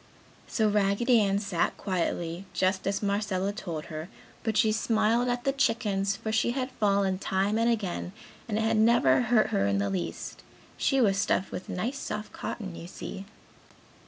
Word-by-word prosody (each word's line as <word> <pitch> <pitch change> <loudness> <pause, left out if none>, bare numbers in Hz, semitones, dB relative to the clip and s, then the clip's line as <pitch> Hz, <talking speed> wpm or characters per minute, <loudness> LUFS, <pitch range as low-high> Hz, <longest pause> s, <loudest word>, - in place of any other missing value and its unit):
So, 220 -2 +1
Raggedy 210 +3 +3
Ann 200 -1 +2
sat 200 -4 -1
quietly, 175 -1 -2
just 185 0 0
as 195 +1 -1
Marcella 200 -1 0
told 165 -7 -5
her, 155 +3 -5 0.3
but 220 -2 -1
she 220 - +4
smiled 225 +2 +2
at 245 0 -1
the 275 - +2
chickens 205 -7 +1
for 220 - -4
she 220 +2 +2
had 260 0 -2
fallen 195 -2 +2
time 195 +3 0
and 230 +1 +3
again 200 -6 -2 0.4
and 215 -2 -1
it - - +1
had 225 0 +2
never 235 +3 +5
hurt 240 -2 +3
her 100 0 +1
in 100 0 +1
the 100 0 0
least. 85 -3 -4 0.3
She 270 - +1
was 195 -5 +3
stuffed 190 - +1
with 185 - -6
nice 235 +9 -2
soft 210 0 -5
cotton, 190 -7 -5
you 170 - -8
see. 195 +1 -7
205 Hz, 175 wpm, -28 LUFS, 190-225 Hz, 0.4 s, never